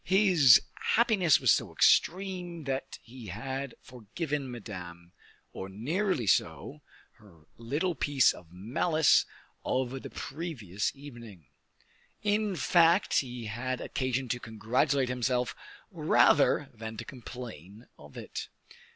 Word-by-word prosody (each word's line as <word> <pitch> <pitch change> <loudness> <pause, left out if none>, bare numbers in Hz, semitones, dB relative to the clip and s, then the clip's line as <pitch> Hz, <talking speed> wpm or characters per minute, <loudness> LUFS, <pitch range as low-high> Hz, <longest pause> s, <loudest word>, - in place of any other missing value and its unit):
his 180 - +6 0.4
happiness 215 -9 +4
was - - +4
so - - +1
extreme 180 -2 +1
that 135 -1 -4
he 120 -1 -11
had 130 +7 -5
forgiven 135 - -5
Madame, 90 -7 -9 0.4
or 95 - -6
nearly 150 - -1
so, 100 - 0 0.4
her 90 -8 -19
little 145 +10 -2
piece 145 -4 +3
of 85 -2 -15
malice 135 - +2 0.4
of 130 0 -2
the - - -8
previous 125 - -4
evening. 120 - -12 0.8
In 210 -1 +1
fact, 170 +2 +4
he 125 -3 -6
had 125 +4 -3
occasion 130 0 -2
to 120 - -1
congratulate 125 +5 0
himself 125 -1 -1 0.4
rather - - +3
than 110 0 -8
to - - -6
complain 115 - -10
of 75 0 -14
it. - - -6
130 Hz, 115 wpm, -29 LUFS, 110-155 Hz, 0.8 s, his